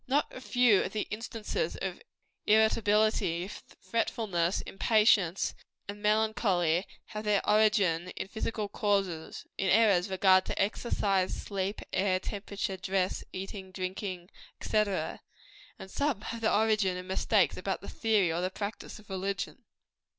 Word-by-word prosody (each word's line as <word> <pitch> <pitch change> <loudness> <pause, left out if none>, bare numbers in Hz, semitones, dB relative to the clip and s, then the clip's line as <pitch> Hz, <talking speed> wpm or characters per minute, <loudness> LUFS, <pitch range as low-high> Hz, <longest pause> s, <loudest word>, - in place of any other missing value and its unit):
Not 280 +3 +1
a 255 - -8
few 245 -6 +4
of 185 - -4
the 215 - -1
instances 225 - -3
of - - -5 0.5
irritability, 215 -4 +3
fretfulness, 205 -5 -2
impatience 200 -4 +2 0.3
and 205 +1 -7
melancholy, 210 -5 +2 0.2
have 215 0 -5
their 210 -2 +1
origin 210 -5 +3
in - - -4
physical 220 0 -3
causes 195 -6 -1
in 195 - +1
errors 200 -3 +4
in - - -11
regard 185 0 +5
to - - -4
exercise, 195 -2 0
sleep, 195 0 -3
air, 185 -1 +2
temperature, 200 -1 -4
dress, 185 0 -1
eating, 190 0 -6
drinking, 185 -1 -5 0.3
&c. - - -5
and 200 -3 0 0.8
some 285 -7 0
have 230 +1 -6
their 225 - +2
origin 210 -4 +2
in 180 - -7
mistakes 190 +1 +2
about - - -3
the - - -10
theory 210 -7 +1
or 170 - -1
the 185 - 0
practice 200 +3 -6
of 215 -1 -16
religion. 195 +1 -4
200 Hz, 135 wpm, -30 LUFS, 185-215 Hz, 0.8 s, regard